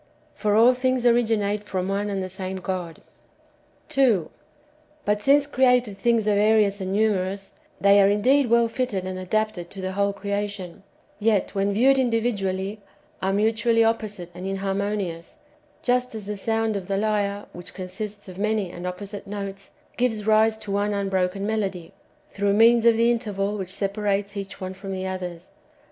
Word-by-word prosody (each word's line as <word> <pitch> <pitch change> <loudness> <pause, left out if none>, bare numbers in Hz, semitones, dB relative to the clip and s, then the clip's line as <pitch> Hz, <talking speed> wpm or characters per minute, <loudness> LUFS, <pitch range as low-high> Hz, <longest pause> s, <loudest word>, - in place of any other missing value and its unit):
For 210 -2 0
all 235 +3 +6
thino;s 255 0 0
orio; 240 -1 +4
inate 210 -1 0
from 190 -3 -3
one 200 +1 -1
and 195 -1 -2
the - - -3
same 190 0 -5
God. 180 -3 -5 0.9
2. 255 - +2 0.7
But 210 0 +1
since 280 +5 +4
created 250 -6 +2
things 230 +1 +1
are 210 - +4
various 205 -1 +3
and 190 0 -3
numerous, 195 -2 0 0.3
they 200 0 +6
are 195 - +5
indeed 250 +6 +3
wxll 235 0 +4
fitted 225 -7 -2
and 185 0 -4
adapted 185 -2 -2
to 195 - -9
the 185 0 -3
whole 200 +1 +1
creation; 200 -2 -4 0.4
yet, 210 -3 +1
when 200 0 +1
viewed 265 +5 +4
individually, 210 -5 -1 0.4
are 190 - +1
mutually 225 +3 +2
opposite 215 -6 -2
and 180 +2 -6
inhar 195 0 -2
monious, 200 -5 -3 0.4
just 250 -1 +1
as 215 -2 -5
the 210 +1 -4
sound 225 +2 0
of 190 -2 -4
the 195 0 0
lyre, 205 -1 0
which 175 0 -9
consists 200 +3 -6
of 185 0 -10
many 210 -3 0
and 175 +1 -6
opposite 200 +3 -6
notes, 200 -1 -6 0.3
gives 225 -4 0
rise 220 0 +4
to 210 -2 -7
one 205 +1 0
unbroken 195 -1 -1
melody, 195 -6 -2 0.3
through 200 0 0
means 230 +2 +5
of 230 -1 +5
the 230 +1 +4
interval 210 -4 -1
which 190 -3 -5
separates 200 +1 -2
each 200 0 -6
one 185 -1 -5
from 195 +1 -7
the 190 0 -4
others. 180 -2 -6
205 Hz, 170 wpm, -24 LUFS, 195-220 Hz, 0.9 s, all